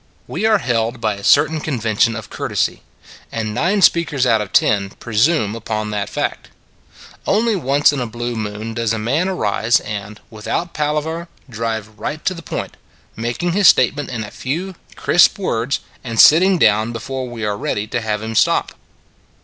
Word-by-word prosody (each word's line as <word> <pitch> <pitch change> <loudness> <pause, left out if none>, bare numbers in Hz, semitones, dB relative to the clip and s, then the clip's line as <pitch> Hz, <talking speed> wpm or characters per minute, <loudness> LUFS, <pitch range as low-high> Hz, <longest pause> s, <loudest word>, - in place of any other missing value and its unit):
We 220 - -1
are 220 -1 +4
held 120 - -1
by 110 - 0
a 100 0 -10
certain 155 +6 +4
convention 115 -5 0
of 110 -2 -8
courtesy: - - -2 0.5
and 110 -2 -3
nine 190 - +1
speakers 150 -7 +3
out 115 -3 +3
of 105 - -6
ten 100 -2 +2
pre 110 +2 -9
sume 115 -3 +3
upon 110 -1 -4
that 105 -1 -2
fact. - - -3 0.8
Only 220 +2 +2
once 145 -3 +3
in 140 - -2
a 125 - -2
blue 120 +1 -4
moon 110 +1 -5
does 115 -1 -1
a - - -1
man 140 - 0
arise 115 - +1
and, 105 0 -7
without 115 - -3
palaver, 155 +3 -2 0.2
drive 110 -2 -4
right 155 +1 -5
to 185 - +1
the 170 - -9
point, - - -6 0.4
making 120 +10 -2
his 195 +1 +4
statement 145 +4 +3
in 120 -3 -4
a 105 - -9
few 170 +9 -4 0.2
crisp 175 - +4
words, 130 - -1 0.2
and 115 -3 -4
sitting 185 +4 +7
down 110 -4 +3
before 130 +2 -5
we 115 -3 -5
are 105 -1 -1
ready 105 0 -2
to 115 +2 -3
have 105 -1 -2
him 110 0 -4
stop. 105 - +2
120 Hz, 175 wpm, -19 LUFS, 110-155 Hz, 0.8 s, sitting